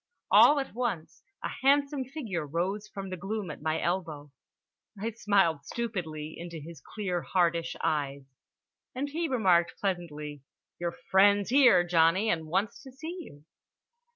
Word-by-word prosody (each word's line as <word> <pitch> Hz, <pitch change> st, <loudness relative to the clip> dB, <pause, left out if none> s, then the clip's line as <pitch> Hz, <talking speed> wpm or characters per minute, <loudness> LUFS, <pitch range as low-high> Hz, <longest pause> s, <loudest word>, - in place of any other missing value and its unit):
All 290 Hz, -, +7 dB
at 270 Hz, -, -5 dB
once 225 Hz, -9 st, -3 dB, 0.2 s
a -, -, -2 dB
handsome 280 Hz, 0 st, +3 dB
figure 235 Hz, -, -4 dB
rose 180 Hz, +8 st, -2 dB
from 195 Hz, -2 st, -7 dB
the 185 Hz, -, -4 dB
gloom 195 Hz, -1 st, -4 dB
at -, -, -10 dB
my 155 Hz, +1 st, 0 dB
elbow. 160 Hz, -5 st, -3 dB, 0.7 s
I 225 Hz, +3 st, -2 dB
smiled 195 Hz, -9 st, +2 dB
stupidly 160 Hz, -8 st, -4 dB
into 170 Hz, -1 st, -7 dB
his 155 Hz, 0 st, -11 dB
clear 185 Hz, -5 st, -3 dB
hardish 170 Hz, -2 st, 0 dB
eyes. 140 Hz, -2 st, -1 dB, 0.7 s
And 280 Hz, +3 st, -2 dB
he 330 Hz, +3 st, -2 dB
remarked 185 Hz, -, +2 dB
pleasantly: 150 Hz, -7 st, -4 dB, 0.4 s
"Your 170 Hz, 0 st, -2 dB, 0.2 s
friend's 200 Hz, +2 st, +5 dB
here, 255 Hz, -9 st, +6 dB
Johnny, 175 Hz, +5 st, +3 dB
and 160 Hz, -2 st, -2 dB
wants 190 Hz, +6 st, -1 dB
to 265 Hz, -, -12 dB
see 315 Hz, +7 st, -7 dB
you." 145 Hz, -, -12 dB
185 Hz, 145 wpm, -29 LUFS, 165-230 Hz, 0.7 s, All